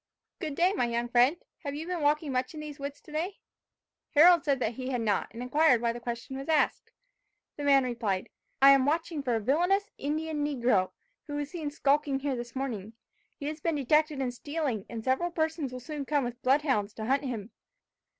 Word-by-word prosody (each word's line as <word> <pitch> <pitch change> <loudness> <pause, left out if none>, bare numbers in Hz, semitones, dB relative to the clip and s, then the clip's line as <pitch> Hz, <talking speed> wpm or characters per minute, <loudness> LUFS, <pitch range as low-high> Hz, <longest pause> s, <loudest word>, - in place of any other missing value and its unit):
"Good 310 -6 -4
day, 360 +5 +3
my 320 - +1
young 235 0 -1
friend. 250 +7 +4 0.2
Have 280 0 -5
you 310 +2 -5
been 355 -2 -3
walking 295 0 +2
much 255 +3 -1
in - - -6
these 300 -2 -8
woods 280 +1 -6
today?" 325 +6 -4 0.8
Harold 340 +1 +7
said 280 -3 +1
that 230 -2 -1
he 255 +2 -5
had 250 -3 -1
not, 210 -3 +1
and 230 +2 -7
inquired 290 0 +4
why 235 0 0
the 240 - -7
question 240 +2 -5
was 275 - -7
asked. 310 -2 +1 0.6
The 290 - -6
man 275 -1 +5
replied, 230 -6 -2 0.3
"I 275 - +10
am 275 -1 +5
watching 320 0 0
for 250 -4 0
a - - +1
villainous 355 - +1
Indian 305 +1 -2
negro, 240 -10 +2 0.4
who 290 - -5
was 290 0 -3
seen 320 -5 -3
skulking 285 -1 +1
here 280 -1 -1
this 240 0 -7
morning. 230 -6 -4 0.4
He 285 - -7
has 305 +1 -4
been 330 0 0
detected 300 +1 +2
in 255 -2 -1
stealing, 275 -4 -3
and 225 -1 -6
several 265 +8 +1
persons 320 -4 -1
will 255 - -6
soon 295 +3 -5
come 290 0 +1
with 245 0 -5
blood 275 +3 +3
hounds 215 -8 0
to 220 - -5
hunt 275 +4 +1
him. 230 -4 -5
280 Hz, 210 wpm, -29 LUFS, 245-305 Hz, 0.8 s, I